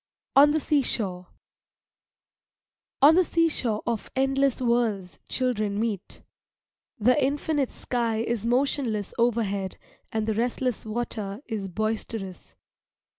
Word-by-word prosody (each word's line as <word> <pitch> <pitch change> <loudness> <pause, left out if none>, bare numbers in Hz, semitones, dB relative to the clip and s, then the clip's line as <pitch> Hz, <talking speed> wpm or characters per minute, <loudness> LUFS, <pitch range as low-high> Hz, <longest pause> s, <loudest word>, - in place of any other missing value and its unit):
ON 285 +2 +8
THE 310 +1 +2
SEASHORE 210 - 0 1.8
On 295 +3 +9
the 365 +3 +5
seashore 300 -11 0
of 230 -3 -2
endless 270 0 +2
worlds 225 - 0
children 215 -6 0
meet. 215 -4 -3 0.7
The 250 +6 +3
infinite 285 0 0
sky 235 -3 -2
is 235 -2 -2
motionless 240 -4 0
overhead 205 -5 0 0.3
and 220 -1 -1
the 220 - 0
restless 240 +1 -1
water 215 0 -4
is 210 -4 -4
boisterous. 215 -1 -4
235 Hz, 105 wpm, -26 LUFS, 210-265 Hz, 1.8 s, On